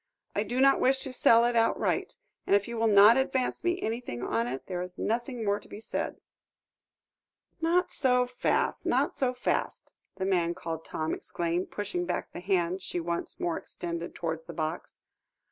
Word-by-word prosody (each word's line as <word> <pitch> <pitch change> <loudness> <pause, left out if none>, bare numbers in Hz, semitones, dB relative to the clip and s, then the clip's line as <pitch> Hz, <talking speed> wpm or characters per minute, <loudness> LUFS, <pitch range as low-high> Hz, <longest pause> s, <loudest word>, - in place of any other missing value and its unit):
"I 205 - +2
do 240 +4 -2
not 275 +1 +5
wish 265 +1 +3
to 265 - -5
sell 230 -2 +5
it 240 0 +1
outright, 230 0 +1 0.3
and - - +5
if 200 0 +1
you 235 - -5
will 225 0 +2
not 210 +3 +8
advance 265 -1 0
me 350 +1 +1
anything 220 - -3
on 115 0 0
it, 130 +2 -5
there 180 -2 -3
is 180 0 -7
nothing 240 +1 -2
more 205 0 +1
to - - -16
be - - -8
said." 225 - -4 1.4
"Not 345 +3 +2
so 250 -2 +3
fast, 250 0 0
not - - +1
so 260 -2 +1
fast," 250 - -2 0.2
the 190 - -2
man 175 -3 +1
called 160 -1 -5
Tom 155 0 -2
exclaimed, 175 +1 -2
pushing 190 -4 -3
back 180 - -2
the - - -7
hand 185 0 0
she 180 -1 -3
once 170 0 -3
more 170 -2 -1
extended 170 0 -6
towards 160 -1 -4
the 170 - -7
box. 155 +1 -4
200 Hz, 180 wpm, -29 LUFS, 170-245 Hz, 1.4 s, not